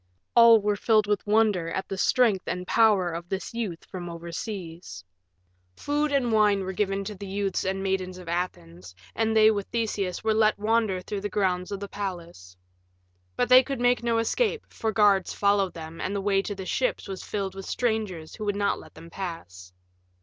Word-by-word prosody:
All 230 -1 +8
were 210 0 0
filled 215 +1 +3
with 205 0 -1
wonder 210 -6 +2
at 190 - -3
the 195 - -4
strength 210 0 +2
and 180 +1 -3
power 205 -5 +3
of 170 +1 -6
this 190 +4 -4
youth 210 -8 -4
from 175 -2 -7
overseas. 170 - -7 0.7
Food 295 +1 -1
and 265 -4 +1
wine 210 -2 +3
were 190 0 -4
given 195 0 -1
the 200 -1 -7
youths 195 0 -2
and 190 0 -2
maidens 185 -1 -2
of 180 -2 -11
Athens, 90 - -5 0.2
and 220 0 +1
they 215 0 +7
with 200 -2 -3
Theseus 210 -5 -2
were 220 0 +2
let 215 0 +3
wander 210 -3 +1
through 200 +2 -5
the 205 - -3
grounds 185 -2 -1
of 200 - -3
the 200 - -6
palace. 170 - -7 0.8
But 245 - +1
they 255 0 +9
could 270 0 -5
make 245 0 +3
no 235 -1 +1
escape, 435 - 0
for 220 - -2
guards 200 -3 +3
followed 200 -2 +1
them 160 0 -8
and 200 - -2
the - - 0
way 195 0 +2
to 205 +1 -5
the 190 -1 -7
ships - - -1
was 190 -1 -6
filled 195 -2 -3
with 195 0 -8
strangers 215 -9 -2
who 215 - -6
would 205 -1 0
not 200 0 0
let - - -15
them 165 +1 -13
pass. 90 - -7
200 Hz, 195 wpm, -26 LUFS, 180-220 Hz, 0.8 s, they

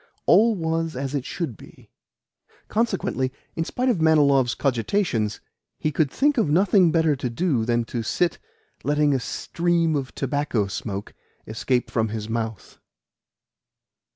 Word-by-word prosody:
All 225 +1 +5
was 165 -2 -2
as 135 +1 -3
it 140 -3 -2
should 165 -10 -4
be. - - -17 0.8
Consequently, 190 - 0 0.2
in 165 - 0
spite 250 +9 -2
of 225 -10 +2
Manilov's 140 -6 +4
cogitations, 120 - 0 0.4
he 155 - -1
could 150 -1 +1
think 285 - +2
of 190 - +2
nothing 185 +1 +4
better 160 -3 +3
to 130 -2 -3
do 125 -3 0
than 120 0 +1
to 120 0 -4
sit 170 +10 0 0.4
letting 145 +1 +2
a 135 - +1
stream 170 +5 0
of 135 -2 -4
tobacco 135 -5 0
smoke 100 0 -5 0.3
escape 120 +3 -1
from 110 -2 +1
his 110 0 -5
mouth. 110 -3 -4
145 Hz, 140 wpm, -24 LUFS, 120-170 Hz, 0.8 s, All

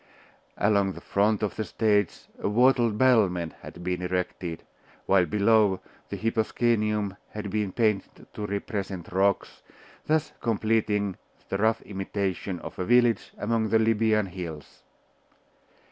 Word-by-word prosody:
Along 100 -1 +2
the - - -9
front 105 +2 +1
of 105 - -1
the 110 - 0
stage 105 -1 +1 0.2
a - - -1
wattled 120 -1 +3
battlement 100 -10 +3
had 85 - -10
been 90 0 -2
erected, 90 -2 -3 0.4
while 95 -2 +4
below, 105 0 +3 0.3
the - - -4
hyposcenium 110 -2 0
had 105 -2 -6
been 105 -2 -1
painted 105 -2 -1
to 105 - -4
represent 100 -3 -4
rocks, 100 +1 0 0.5
thus 155 0 +1
completing 110 -3 0 0.3
the 95 - -1
rough 110 +1 +2
imitation 95 -2 -3
of - - -9
a - - 0
village 120 +2 +3
among 110 0 0
the 110 - +4
Libyan 110 -1 +2
hills. 85 -5 -8
105 Hz, 130 wpm, -27 LUFS, 95-110 Hz, 0.5 s, while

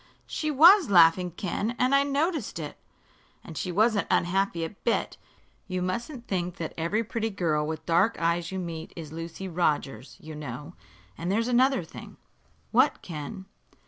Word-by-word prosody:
She 310 - -3
was 330 - +7
laughing, 180 -1 +5
Ken, 200 +6 -3
I 275 +2 +4
noticed 285 - -1
it." 150 -3 -6 0.7
"And 165 - -10
she 180 - -3
wasn't 210 0 +2
unhappy 175 -1 +1
a - - -6
bit. 225 +3 -2 0.5
You 185 -2 -2
mustn't 235 +7 -4
think 180 -2 -2
that 160 - -5
every 170 +8 0
pretty 225 0 -2
girl 160 -7 0
with 160 0 -5
dark 180 +7 +2
eyes 170 +1 0
you 190 - -4
meet 170 -3 -6
is 160 -3 -8
Lucy 165 +3 -6
Rogers, 150 -8 -1
you 160 -4 -9
know. 150 +2 -7 0.5
And 170 +3 -2
there's 225 +3 +1
another 250 -3 +3
thing." 160 - -11 0.5
"What, - - +3
Ken?" 175 +4 -7
180 Hz, 155 wpm, -27 LUFS, 165-230 Hz, 0.7 s, was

